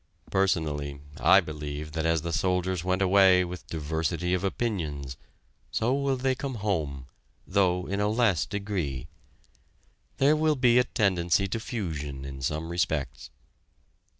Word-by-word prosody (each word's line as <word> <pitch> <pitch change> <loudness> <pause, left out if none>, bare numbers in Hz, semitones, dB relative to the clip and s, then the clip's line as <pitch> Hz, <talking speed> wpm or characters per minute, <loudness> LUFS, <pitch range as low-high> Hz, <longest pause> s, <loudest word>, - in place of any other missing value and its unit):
Personally, 75 -7 0 0.2
I - - +6
believe 75 0 -6
that 80 +1 -1
as 80 -2 +1
the 85 0 -3
soldiers 90 -1 0
went 95 +1 +1
away 95 -1 +5
with 90 0 -8
diversity 80 +3 -2
of 90 0 0
opinions, 80 - -2 0.5
so 120 +3 0
will 140 -1 0
they 130 +1 +1
come 135 0 -4
home, 80 - -2 0.4
though 90 -2 +1
in 100 +1 -2
a 105 - +2
less 110 -6 +2
degree. 95 - -3 1.1
There 145 +3 +4
will 155 0 +2
be 125 -2 +4
a 125 - +3
tendency 95 -4 +1
to 115 - -2
fusion 75 - -4
in 65 -1 -7
some 75 +5 -2
respects. 85 -5 -2
90 Hz, 140 wpm, -27 LUFS, 75-105 Hz, 1.1 s, I